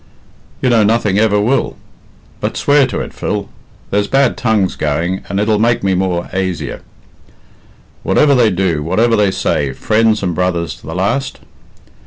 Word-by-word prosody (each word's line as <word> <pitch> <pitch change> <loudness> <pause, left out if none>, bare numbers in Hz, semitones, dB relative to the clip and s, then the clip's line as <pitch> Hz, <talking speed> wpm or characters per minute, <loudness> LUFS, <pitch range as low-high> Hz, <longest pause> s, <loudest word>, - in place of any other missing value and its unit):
"You 130 - +3
know 115 -2 +4
nothing 105 -2 +2
ever 105 -2 +3
will." 120 +7 0 0.6
"But - - -3
swear 145 -2 +3
to - - -3
it, - - -7
Phil. 100 -1 -3 0.4
There's 100 0 +1
bad 135 +1 +2
tongues 110 -6 0
going, 85 +5 -1
and 100 - -1
it'll 105 0 +1
make 120 0 +1
me 95 -1 +1
more 90 -2 -1
aisier. 95 -6 -3 1.2
Whatever 145 -2 +3
they 120 -4 +4
do, 90 -5 0
whatever 115 +9 +2
they 105 -2 +3
say, 70 -7 -1
friends 110 +6 +1
and 90 -2 -1
brothers 85 -1 -1
to - - -15
the 80 - -5
last?" 130 +9 -2
100 Hz, 160 wpm, -15 LUFS, 90-115 Hz, 1.2 s, know